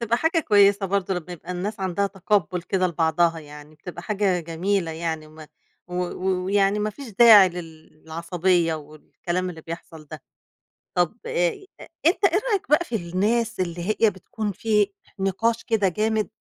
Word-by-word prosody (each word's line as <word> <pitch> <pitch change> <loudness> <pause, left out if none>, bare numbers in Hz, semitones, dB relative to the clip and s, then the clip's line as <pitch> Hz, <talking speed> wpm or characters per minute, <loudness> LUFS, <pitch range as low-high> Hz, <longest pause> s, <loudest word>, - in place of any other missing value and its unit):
بتبقى 235 0 +1
حاجة 325 +4 +1
كويسة 200 -4 +4
برضه 190 0 0
لمّا 180 0 -6
يبقى 175 +1 -7
الناس 200 +4 -4
عَندها 190 +2 0
تقبُّل 190 -2 -1
كده 185 +1 0
لبعضها، 165 0 +1
يعني 150 0 -13
بتبقى 170 +2 -9
حاجة 195 -3 0
جميلة 170 +2 -1
يعني 160 -1 -4
وم 155 +1 -15 0.5
و 180 - -7
و 180 +1 -2
ويعني 200 +1 +2
ما 210 +1 -1
فيش 275 +3 -10
داعي 210 -2 +8
للعصبيّة 165 +1 -2
والكلام 160 +4 -5
اللي 160 -2 -10
بيحصَل 165 -1 -9
ده. 155 -3 -8 0.8
طَب 180 +6 +1
آآ، 175 - -1
أ - - -11 0.2
أنت 360 +4 +3
إيه 380 +1 +3
رأيك 395 -7 -1
بقى 335 +3 +4
في 235 - -4
الناس 210 +5 0
اللي 175 -1 -2 0.2
هي 225 - +5
بتكُون 205 +3 -5
في 210 +1 +1 0.3
نقاش 195 +4 0
كده 215 -4 +1
جامد 215 +3 0
185 Hz, 160 wpm, -24 LUFS, 170-210 Hz, 0.8 s, داعي